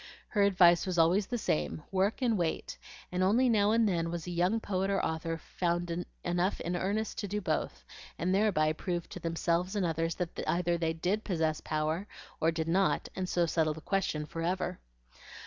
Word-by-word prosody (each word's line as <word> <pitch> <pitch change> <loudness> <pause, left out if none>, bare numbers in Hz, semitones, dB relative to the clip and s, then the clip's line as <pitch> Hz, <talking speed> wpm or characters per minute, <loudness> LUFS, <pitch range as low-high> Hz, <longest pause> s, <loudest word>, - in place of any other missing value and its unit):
Her 210 - +1
advice 180 -3 +5
was 180 -2 -1
always 180 +5 +4
the 245 - -2
same, 80 - -1
"Work 195 +7 +1
and 235 -3 +3
wait;" 170 -4 -2 0.4
and 180 0 -1
only 220 +8 +4
now 210 -3 +4
and 225 0 +4
then 165 -3 0
was 170 -1 -4
a 180 - -5
young 180 +6 +1
poet 195 -2 -1
or 195 -1 +2
author 160 +1 -2
found 175 +1 -2 0.3
enough 175 +2 0
in 175 +1 -2
earnest 205 +5 -1
to 205 - -3
do 205 +2 -2
both, 195 - -2 0.3
and 180 +2 0
thereby 190 -7 +3
prove 175 +1 -3
to - - -7
themselves 170 +3 -1
and 200 -3 +1
others 165 0 -1
that 175 -2 -4
either 175 0 +1
they 165 -1 0
DID 185 +6 -1
possess 160 -5 0
power, 155 +5 -1 0.3
or 160 - +3
did 160 -1 -2
not, 190 +3 +1
and 185 -1 -3
so 175 -1 +2
settle 160 -2 +1
the 160 - -9
question 180 -6 -1
forever. 175 +3 -2
175 Hz, 190 wpm, -31 LUFS, 165-195 Hz, 0.4 s, advice